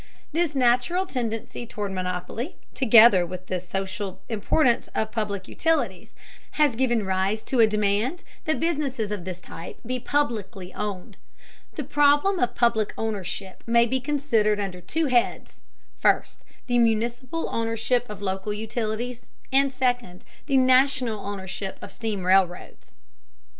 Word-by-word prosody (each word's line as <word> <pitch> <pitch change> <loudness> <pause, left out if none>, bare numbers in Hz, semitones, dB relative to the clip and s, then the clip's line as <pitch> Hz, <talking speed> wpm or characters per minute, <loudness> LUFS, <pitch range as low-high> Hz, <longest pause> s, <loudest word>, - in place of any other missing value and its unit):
This 325 -1 0
natural 255 +9 +2
tendency 235 - -4
toward 205 -2 -4
monopoly, 185 - -4 0.2
together 230 -6 +7
with 180 +1 -7
the 185 0 -2
social 190 +1 -4
importance 235 +4 +2
of 220 0 -1
public 205 -4 -3
utilities, 325 0 -1 0.4
has 295 -6 +3
given 240 -4 +1
rise 190 +3 0
to 260 - -1
a 225 - +7
demand 210 - 0 0.2
that 315 -1 0
businesses 280 -10 -1
of 200 -4 -4
this 185 -1 -5
type 170 -1 -10
be 255 +2 -2
publicly 225 -9 -2
owned. 200 -2 -5 0.6
The 300 - -3
problem 290 +7 +3
of 245 - 0
public 235 -3 +2
ownership 195 -3 -4
may 235 0 +5
be 260 +3 0
considered 240 -7 +1
under 190 -3 -4
two 320 - -1
heads: 240 - 0 0.3
first, - - +1 0.2
the 245 -1 +2
municipal 240 +6 0
ownership 230 +2 0
of 205 -1 -8
local 190 +2 -2
utilities; 225 +3 -3 0.3
and, 275 0 +4
second, 245 -8 -1 0.2
the 275 -3 +3
national 255 -4 +3
ownership 195 -1 -5
of - - -9
steam 215 -5 -3
railroads. 185 - +1
225 Hz, 135 wpm, -25 LUFS, 195-255 Hz, 0.6 s, together